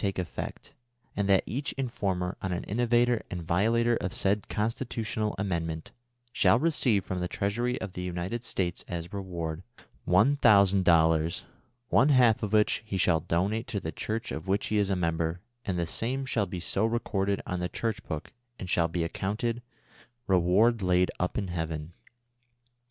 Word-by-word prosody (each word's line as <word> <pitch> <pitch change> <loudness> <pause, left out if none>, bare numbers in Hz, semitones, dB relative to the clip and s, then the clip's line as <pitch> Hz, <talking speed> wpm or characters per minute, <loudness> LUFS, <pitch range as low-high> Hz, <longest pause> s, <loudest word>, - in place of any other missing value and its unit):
311 100 -2 0
take - - -22 0.2
effect, - - -22 0.4
and 100 -1 0
that 95 -1 +5
each 140 +4 -3
informer 100 -9 -2
on 95 - -2
an 90 - -2
innovator 120 +1 +2
and 90 -2 -5
violator 115 +7 +2
of 95 - -4
said 100 +1 0
Constitutional 110 -1 -2
Amendment 85 -5 -3 0.4
shall - - +4
receive 125 - +2
from 95 - -3
the 90 - -1
treasury 120 +7 -1
of 95 - -6
the 90 - -5
United 90 +6 -3
States 90 -6 -2
as 85 0 -5
reward 85 -5 -4 0.4
one 105 +11 +4
thousand 100 -6 +5
dollars, 80 -1 +3 0.5
one 135 +5 +4
half 125 -5 +5
of 105 - -2
which 105 -1 +3
he 105 -3 -4
shall 85 -3 +3
donate 100 +9 -1
to 100 - -2
the 80 - -4
church 110 +5 -3
of 80 +4 -5
which 100 +2 +1
he 110 - +1
is 100 -1 +2
a 95 - +1
member, 85 -1 -1 0.3
and 95 -2 -1
the 85 - 0
same 130 +10 -2
shall 110 -5 0
be 90 0 -5
so 95 +4 -1
recorded 100 -4 0
on 90 - -3
the 90 0 -2
church 110 -2 -2
book, 80 +1 -6 0.2
and 90 - -6
shall 85 -1 +3
be 85 0 -2
accounted, 105 +7 -2 0.3
' 120 0 -28
Re 95 -5 +3
ward 105 +7 +3
laid 90 0 +2
up 90 - -1
in 100 -3 -2
heaven.'' 80 -1 -4
95 Hz, 180 wpm, -28 LUFS, 90-115 Hz, 0.5 s, that